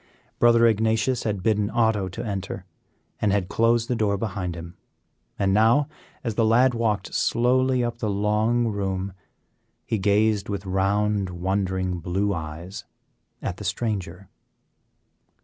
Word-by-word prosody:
Brother 115 Hz, 0 st, +5 dB
Ignatius 110 Hz, +2 st, +1 dB
had 100 Hz, -4 st, -2 dB
bidden 105 Hz, -2 st, +1 dB
Otto 110 Hz, -4 st, +1 dB
to 95 Hz, -, -6 dB
enter, 100 Hz, -3 st, -4 dB, 0.6 s
and 105 Hz, -, +2 dB
had 100 Hz, -1 st, +2 dB
then -, -, -11 dB
closed 115 Hz, 0 st, +2 dB
the 125 Hz, -, 0 dB
door 105 Hz, -3 st, +1 dB
behind 95 Hz, -4 st, -3 dB
him; 85 Hz, +1 st, -9 dB, 0.6 s
and 95 Hz, -1 st, +1 dB
now, 115 Hz, +7 st, +4 dB, 0.4 s
as 115 Hz, -4 st, -2 dB
the 115 Hz, -, +1 dB
lad 120 Hz, +4 st, +4 dB
walked 110 Hz, -4 st, -1 dB
slowly 125 Hz, +1 st, +2 dB
up 120 Hz, 0 st, -3 dB
the 110 Hz, -, -1 dB
long 105 Hz, +4 st, +1 dB
room, 95 Hz, -2 st, -3 dB, 0.7 s
he 110 Hz, -3 st, -1 dB
gazed 105 Hz, +1 st, +2 dB
with 100 Hz, -2 st, -4 dB
round, 100 Hz, +1 st, +1 dB
wondering 95 Hz, 0 st, -1 dB
blue 95 Hz, +4 st, -1 dB
eyes 85 Hz, +3 st, -6 dB, 0.6 s
at -, -, -3 dB
the -, -, -8 dB
stranger. 100 Hz, -5 st, -3 dB
105 Hz, 140 wpm, -24 LUFS, 95-115 Hz, 0.7 s, Brother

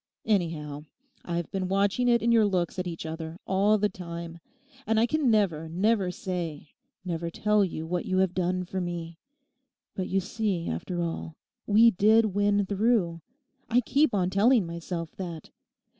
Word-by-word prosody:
Anyhow. 155 Hz, -7 st, -1 dB, 0.4 s
I've 170 Hz, -1 st, -3 dB
been 190 Hz, -1 st, -2 dB
watching 200 Hz, +6 st, +1 dB
it 235 Hz, -1 st, +3 dB
in 235 Hz, -, +3 dB
your 225 Hz, -2 st, +5 dB
looks 185 Hz, -1 st, -1 dB
at 180 Hz, -, -2 dB
each 165 Hz, -2 st, -6 dB
other 160 Hz, +1 st, -6 dB
all 200 Hz, +3 st, +3 dB
the 210 Hz, 0 st, +2 dB
time. 170 Hz, -3 st, -8 dB, 0.5 s
And 225 Hz, 0 st, +3 dB
I 230 Hz, -, +4 dB
can 290 Hz, +1 st, +1 dB
never, 175 Hz, -8 st, +1 dB
never 195 Hz, +3 st, +1 dB
say, 170 Hz, -5 st, -5 dB, 0.3 s
never 170 Hz, -1 st, -3 dB
tell 210 Hz, +4 st, +2 dB
you 160 Hz, -4 st, -3 dB
what 175 Hz, +1 st, -3 dB
you 185 Hz, -, 0 dB
have 190 Hz, -1 st, +2 dB
done 180 Hz, 0 st, 0 dB
for 185 Hz, +1 st, -4 dB
me. 170 Hz, -1 st, -5 dB, 0.7 s
But 185 Hz, -, -4 dB
you 195 Hz, -, +2 dB
see, 195 Hz, -3 st, -2 dB
after 175 Hz, -, -3 dB
all, 165 Hz, -1 st, -4 dB, 0.3 s
we 225 Hz, +3 st, +6 dB
did 215 Hz, +2 st, +4 dB
win 205 Hz, 0 st, +2 dB
through; 195 Hz, -4 st, +1 dB, 0.5 s
I 240 Hz, +1 st, +4 dB
keep 275 Hz, 0 st, +2 dB
on 185 Hz, -2 st, +1 dB
telling 215 Hz, +2 st, +4 dB
myself 170 Hz, 0 st, -5 dB
that. 170 Hz, -5 st, -7 dB
185 Hz, 165 wpm, -27 LUFS, 170-210 Hz, 0.7 s, we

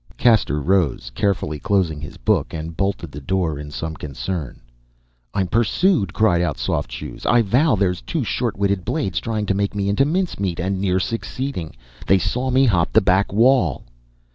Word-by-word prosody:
Caxter 110 Hz, -, +3 dB
rose, 85 Hz, -4 st, 0 dB
carefully 75 Hz, -4 st, -1 dB
closing 90 Hz, -5 st, 0 dB
his 75 Hz, -, -8 dB
book, -, -, 0 dB
and 80 Hz, +1 st, -6 dB
bolted 95 Hz, -4 st, -2 dB
the 75 Hz, -, -8 dB
door 80 Hz, -1 st, -1 dB
in 75 Hz, 0 st, -7 dB
some 80 Hz, +3 st, -4 dB
concern. 75 Hz, +1 st, -5 dB, 0.7 s
"I'm 95 Hz, -, 0 dB
pursued," 115 Hz, -, +2 dB
cried 100 Hz, -5 st, +2 dB
out 80 Hz, -5 st, -1 dB
Soft -, -, -2 dB
Shoes. -, -, -7 dB
"I 120 Hz, -1 st, +4 dB
vow 130 Hz, +7 st, +3 dB
there's 95 Hz, -3 st, 0 dB
two -, -, -2 dB
short -, -, -2 dB
witted 100 Hz, -2 st, 0 dB
blades 95 Hz, -, -1 dB
trying 110 Hz, -2 st, -2 dB
to 100 Hz, -, +1 dB
make 100 Hz, +1 st, -1 dB
me 100 Hz, -1 st, 0 dB
into 105 Hz, +7 st, +3 dB
mincemeat 145 Hz, -, -1 dB
and 95 Hz, +2 st, -1 dB
near 95 Hz, -1 st, +1 dB
succeeding. 115 Hz, -, -4 dB, 0.3 s
They 95 Hz, -, +5 dB
saw 120 Hz, +8 st, -1 dB
me 130 Hz, +1 st, +4 dB
hop 90 Hz, -8 st, +2 dB
the -, -, +7 dB
back 95 Hz, +1 st, +2 dB
wall!" 110 Hz, -, +3 dB
95 Hz, 175 wpm, -21 LUFS, 80-110 Hz, 0.7 s, the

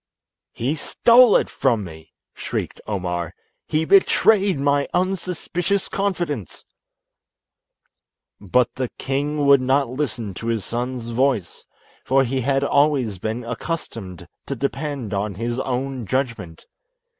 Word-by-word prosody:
"He 130 Hz, +6 st, -1 dB
stole 235 Hz, -, +5 dB
it -, -, +3 dB
from 120 Hz, -6 st, 0 dB
me," 80 Hz, -3 st, -11 dB, 0.2 s
shrieked -, -, -4 dB
Omar; 90 Hz, -5 st, -3 dB, 0.3 s
"he 155 Hz, +1 st, 0 dB
betrayed 195 Hz, -1 st, +4 dB
my 140 Hz, 0 st, +2 dB
unsuspicious 185 Hz, +1 st, -1 dB
confidence." 175 Hz, -, -3 dB, 1.7 s
But 120 Hz, +5 st, +1 dB
the 130 Hz, -2 st, -3 dB
king 145 Hz, +2 st, -1 dB
would 140 Hz, -1 st, +6 dB
not 135 Hz, +1 st, +2 dB
listen 125 Hz, -6 st, -3 dB
to 115 Hz, -, -7 dB
his 115 Hz, -4 st, -1 dB
son's 120 Hz, 0 st, -3 dB
voice, 120 Hz, -6 st, 0 dB, 0.4 s
for 135 Hz, +1 st, +3 dB
he 130 Hz, +1 st, -1 dB
had 135 Hz, +2 st, +1 dB
always 140 Hz, -8 st, +2 dB
been 110 Hz, +5 st, -3 dB
accustomed 115 Hz, -, -5 dB, 0.2 s
to 140 Hz, -, -3 dB
depend 140 Hz, -3 st, -3 dB
on 100 Hz, 0 st, -2 dB
his 120 Hz, +4 st, -3 dB
own 130 Hz, -2 st, -3 dB
judgment. 115 Hz, -10 st, -3 dB
130 Hz, 120 wpm, -22 LUFS, 115-145 Hz, 1.7 s, would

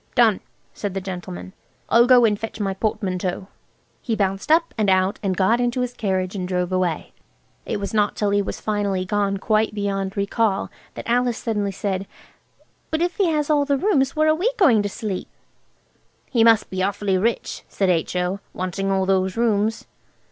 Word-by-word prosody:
"Done!" 230 Hz, -5 st, +4 dB, 0.3 s
said 200 Hz, -2 st, -4 dB
the -, -, 0 dB
gentleman. 185 Hz, 0 st, -7 dB, 0.3 s
"I'll 235 Hz, +1 st, +5 dB
go 250 Hz, -2 st, +7 dB
and 210 Hz, -2 st, +1 dB
fetch 225 Hz, -1 st, -6 dB
my 195 Hz, -2 st, -1 dB
portmanteaus." 190 Hz, -3 st, -2 dB, 0.6 s
He 230 Hz, -, -1 dB
bounced 195 Hz, +5 st, -1 dB
up 330 Hz, +1 st, +3 dB
and 210 Hz, -2 st, +1 dB
out 190 Hz, +1 st, +2 dB
and 190 Hz, -3 st, -1 dB
got 225 Hz, +6 st, +3 dB
into 245 Hz, +1 st, 0 dB
his 250 Hz, 0 st, -2 dB
carriage 190 Hz, -4 st, -1 dB
drove 180 Hz, 0 st, -1 dB
away. 180 Hz, -4 st, -1 dB, 0.5 s
It -, -, -2 dB
was 200 Hz, +1 st, -4 dB
not 210 Hz, -1 st, +2 dB
till 205 Hz, -1 st, 0 dB
he 205 Hz, 0 st, +3 dB
was 195 Hz, -, -5 dB
finally 200 Hz, -3 st, -1 dB
gone 200 Hz, 0 st, 0 dB
quite 215 Hz, +2 st, +1 dB
beyond 195 Hz, -1 st, -2 dB
recall 200 Hz, 0 st, 0 dB, 0.2 s
that -, -, -7 dB
Alice 245 Hz, 0 st, +1 dB
suddenly 210 Hz, -3 st, -1 dB
said– 195 Hz, 0 st, -3 dB, 0.8 s
"But 315 Hz, +1 st, 0 dB
if 355 Hz, 0 st, -2 dB
he 390 Hz, -, +3 dB
has 305 Hz, -2 st, 0 dB
all 290 Hz, -1 st, +4 dB
the 280 Hz, 0 st, +1 dB
rooms 270 Hz, -6 st, +1 dB
where 310 Hz, 0 st, +3 dB
are -, -, +5 dB
we 360 Hz, +9 st, +1 dB
to 225 Hz, -, +4 dB
sleep?" 200 Hz, -2 st, -4 dB, 1.0 s
"He 235 Hz, -4 st, +4 dB
must 225 Hz, -1 st, +4 dB
be 185 Hz, 0 st, -2 dB
awfully 195 Hz, 0 st, 0 dB
rich," 230 Hz, +4 st, -1 dB
said 195 Hz, -2 st, 0 dB
H.O., 180 Hz, +3 st, -1 dB, 0.2 s
"wanting 185 Hz, +2 st, -2 dB
all 190 Hz, -1 st, +1 dB
those 190 Hz, +1 st, +1 dB
rooms." 225 Hz, -1 st, +1 dB
205 Hz, 175 wpm, -22 LUFS, 190-235 Hz, 1.0 s, go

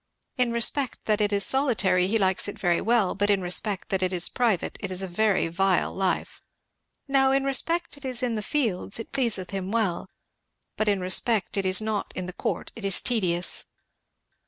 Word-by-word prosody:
In 250 Hz, -3 st, +1 dB
respect 235 Hz, +3 st, 0 dB
that 215 Hz, -1 st, +1 dB
it 205 Hz, 0 st, +1 dB
is 200 Hz, -1 st, +3 dB
solitary, 220 Hz, -9 st, +2 dB
he 220 Hz, +4 st, +1 dB
likes 190 Hz, -2 st, +2 dB
it 205 Hz, -, -6 dB
very 175 Hz, -4 st, +1 dB
well; 225 Hz, -3 st, +2 dB
but 205 Hz, +1 st, 0 dB
in 200 Hz, -1 st, +3 dB
respect 190 Hz, +2 st, -1 dB
that 190 Hz, -1 st, 0 dB
it 185 Hz, 0 st, 0 dB
is 180 Hz, -2 st, +1 dB
private, 225 Hz, -8 st, 0 dB
it 195 Hz, -, -5 dB
is 185 Hz, +1 st, -1 dB
a -, -, -3 dB
very 200 Hz, 0 st, +1 dB
vile 185 Hz, +2 st, +1 dB
life. 190 Hz, -1 st, -2 dB, 0.7 s
Now 270 Hz, -1 st, +3 dB
in 270 Hz, 0 st, +2 dB
respect 330 Hz, +5 st, 0 dB
it 285 Hz, -, -14 dB
is 255 Hz, -1 st, -2 dB
in 245 Hz, -2 st, 0 dB
the 215 Hz, -, -2 dB
fields, 215 Hz, -6 st, -2 dB
it 225 Hz, -, -8 dB
pleaseth 230 Hz, -9 st, 0 dB
him 195 Hz, -1 st, -4 dB
well; 215 Hz, -7 st, -1 dB, 0.7 s
but 215 Hz, -, -1 dB
in 200 Hz, -2 st, +1 dB
respect 195 Hz, +3 st, +1 dB
it 195 Hz, -1 st, 0 dB
is 185 Hz, +3 st, +3 dB
not 215 Hz, -1 st, -3 dB
in 185 Hz, -, -4 dB
the 180 Hz, -, -7 dB
court, -, -, -4 dB
it 225 Hz, -, -10 dB
is 195 Hz, -2 st, +2 dB
tedious.'" 180 Hz, -7 st, +1 dB
205 Hz, 200 wpm, -25 LUFS, 185-235 Hz, 0.7 s, is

